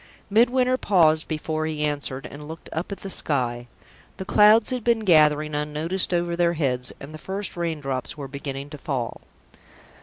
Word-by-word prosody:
Midwinter 250 +3 +3
paused 160 -5 +3
before 155 0 -2
he 155 -1 -3
answered, 145 -2 -3
and 150 +1 -9
looked 160 +1 -10
up 165 +5 -4
at 200 - -6
the 195 - -6
sky. 120 -7 -1 0.5
The 190 - -6
clouds 210 +4 +5
had 250 -3 -2
been 235 -1 +2
gathering 155 -5 +4
unnoticed 150 +6 -1
over 175 -1 0
their 170 0 +2
heads, 125 -6 0
and 145 +2 -10
the 155 - -9
first 195 +3 -3
rain 170 -3 -2
drops 135 0 -4
were 140 -2 -6
beginning 140 0 -6
to 150 - -8
fall. 125 -5 -4
155 Hz, 175 wpm, -24 LUFS, 145-190 Hz, 0.5 s, clouds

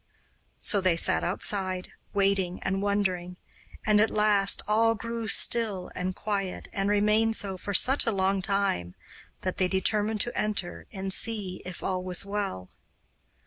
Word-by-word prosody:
So 200 - +2
they 185 -2 +2
sat - - +3
outside, 185 0 -1 0.2
waiting 195 -2 0
and 190 0 -1
wondering; 185 -3 -1 0.5
and 210 -1 +4
at 220 - +3
last 210 -2 +3
all 225 +2 +3
grew 230 +1 -5
still 210 -4 +2
and 180 0 -3
quiet, 195 -3 -3
and 195 0 -1
remained 210 +2 +2
so 195 -3 -1
for 200 +2 -4
such 265 +6 +4
a - - +3
long 195 -1 0
time 195 - -1 0.5
that 185 - -3
they 185 - +2
determined 210 +3 0
to 240 - -1
enter 85 - -3
and 190 0 -4
see 205 -5 -3
if 185 -1 -7
all 185 -1 -1
was 180 0 +2
well. 200 - -4
195 Hz, 150 wpm, -27 LUFS, 185-210 Hz, 0.5 s, and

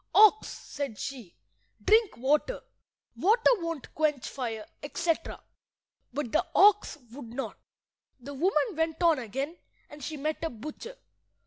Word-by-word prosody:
"Ox," 430 0 +7
said 280 -7 -6
she, 250 -9 -7 0.4
"drink 440 -1 +3
water. 295 - +1 0.5
Water 450 +6 +4
won't 335 -6 -5
quench 300 -4 0
fire," 225 -5 -4 0.2
etc. 330 +3 -2 0.7
But 270 -2 -3
the 320 - +3
ox 410 -4 +5
would 235 -3 -9
not. 270 +3 -5 0.6
The 275 +3 -8
woman 345 - +1
went 320 +2 -1
on 330 -4 +5
again, 270 - -4 0.3
and 295 -1 -10
she 310 +1 -4
met 305 +3 -3
a 325 - 0
butcher. 305 - -8
300 Hz, 130 wpm, -29 LUFS, 270-345 Hz, 0.7 s, Ox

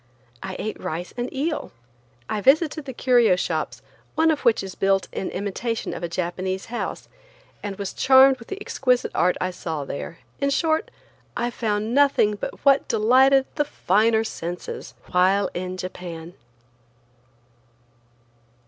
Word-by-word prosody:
I 190 -1 -5
ate 215 - -4
rice 170 +3 -4
and 245 0 -3
eel. 300 +4 -2 0.6
I 210 - -2
visited 305 - +3
the 265 - -5
curio 240 -5 +4
shops, 180 - -3 0.3
one 320 0 +4
of 305 - -1
which 235 -5 +2
is 190 -1 -6
built 195 0 +1
in 190 - -3
imitation 210 +4 -3
of - - -6
a 170 - -3
Japanese 185 +2 -3
house, 240 - -4 0.5
and 205 -1 -4
was 200 -1 -5
charmed 265 0 +6
with 230 - -13
the 395 - -5
exquisite 255 -10 0
art 180 0 +2
I 185 - -1
saw 160 -5 -4
there; 150 +4 -6 0.2
in 280 - +1
short, 315 +3 +1 0.5
I 240 0 -1
found 215 -1 -1
nothing 275 -6 +4
but 205 - -7
what 275 0 +5
delighted 260 +5 +4
the 295 - 0
finer 220 -2 +2
senses 175 -5 -6 0.2
while 190 +2 +3
in 185 +1 -4
Japan. 175 -2 -7
215 Hz, 145 wpm, -24 LUFS, 185-265 Hz, 0.6 s, charmed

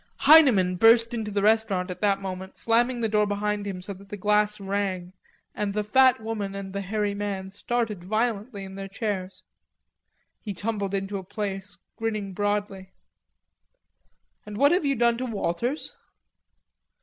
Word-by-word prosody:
Heineman 255 - +6
burst 230 +3 +5
into 220 -3 -3
the 200 -1 -1
restaurant 210 -4 +2
at 180 - -8
that 200 -2 +2
moment, 190 -1 -7
slamming 240 +2 +2
the 225 - +1
door 210 -1 +2
behind 205 0 -2
him 185 -2 -5
so 200 - -6
that 195 +1 -15
the 205 - -6
glass 210 +1 +1
rang, 195 -2 -3 0.4
and 205 -1 -3
the 210 - 0
fat 260 +4 +4
woman 215 -3 -4
and 195 -1 -6
the 200 - -2
hairy 205 +1 -1
man 200 -2 -4
started 210 -2 -2
violently 215 +1 -2
in 190 0 -9
their 195 0 -6
chairs. 195 -2 -4 1.0
He 205 -3 -6
tumbled 200 -1 -2
into 195 0 -3
a - - -9
place, 195 0 -5 0.2
grinning 215 -3 -3
broadly. 205 -1 -2 1.5
"And 210 -1 -8
what 285 +5 +5
have 350 -3 +2
you 275 - +2
done 235 0 +2
to 255 - -2
Walters?" 230 - -2
205 Hz, 160 wpm, -26 LUFS, 195-225 Hz, 1.5 s, Heineman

